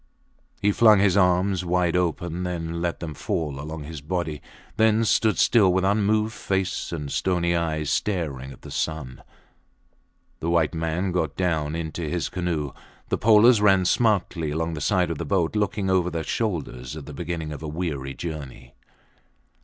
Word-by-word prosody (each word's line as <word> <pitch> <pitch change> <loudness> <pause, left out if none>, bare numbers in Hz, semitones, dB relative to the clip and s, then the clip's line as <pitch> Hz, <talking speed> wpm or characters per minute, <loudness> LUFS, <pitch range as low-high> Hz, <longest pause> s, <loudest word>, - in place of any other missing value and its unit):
He 105 - +2
flung 110 0 +6
his 100 -1 +3
arms 90 0 +3
wide 90 -1 +1
open, 85 -1 -2
let 85 -1 -2
them 80 -3 -5
fall 75 -1 -3
along 75 +1 -6
his 75 -1 -8
body, 80 -2 -3 0.3
then 110 +1 +3
stood 110 0 +2
still 105 -6 +5
with 95 +1 +1
unmoved 105 +2 +2
face 95 -3 -2
and 75 -4 -4
stony 85 -2 +1
eyes, 80 -3 -1
staring 75 -10 -2
at 65 - -14
the - - -9
sun. 80 -5 -3 1.2
The 85 - -2
white 85 -2 +2
man 80 +3 -1
got 80 -5 -1
down 80 -4 0
into 80 0 -4
his 85 -2 -2
canoe. 85 -5 -2 0.4
The - - 0
polers 110 +1 +6
ran 95 -3 +4
smartly 95 -6 +1
along 80 +2 -2
the 75 - -5
sides 90 0 +1
of 80 - -4
the - - -2
boat, 95 -2 0
looking 105 -2 0
over 90 -2 +2
their 80 -2 -3
shoulders 75 - -3
at 75 - -8
the 75 - -9
beginning 80 +1 -4
of 75 - -7
a 80 - -5
weary 75 -4 -4
journey. 70 -6 -7
85 Hz, 165 wpm, -24 LUFS, 80-95 Hz, 1.2 s, flung